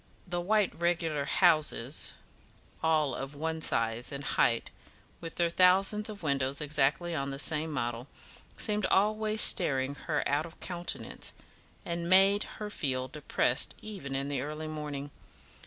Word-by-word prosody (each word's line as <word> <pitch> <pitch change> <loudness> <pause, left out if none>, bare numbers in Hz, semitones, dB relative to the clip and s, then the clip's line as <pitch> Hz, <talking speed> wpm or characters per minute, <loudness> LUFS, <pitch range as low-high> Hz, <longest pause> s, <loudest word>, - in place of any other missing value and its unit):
The 175 -1 -3
white 210 +2 +1
regular 165 -4 -1
houses, 155 -6 +2 0.7
all 155 -3 +2
of 135 +2 -6
one 160 +2 -3
size 115 -3 +1
and 140 0 -6
height, 115 -3 +1 0.5
with 165 -1 -8
their 170 -1 +1
thousands 195 +4 +3
of 205 -4 -9
windows 140 -1 0
exactly 150 +3 0
on 140 -3 -2
the 135 - -5
same 155 +2 0
model, 120 -2 -3 0.5
seemed 210 -2 0
always 215 +2 +2
staring 135 -1 +4
her - - -2
out 145 +3 0
of 165 - -17
countenance, 175 -1 -4 0.5
and 170 0 -3
made 195 +2 +5
her 210 -1 -6
feel 130 -7 -2
depressed 140 -4 +1
even 190 -11 -6
in 135 +1 -2
the 140 -3 -2
early 155 +2 -5
morning. 150 -2 -6
155 Hz, 140 wpm, -30 LUFS, 140-180 Hz, 0.7 s, made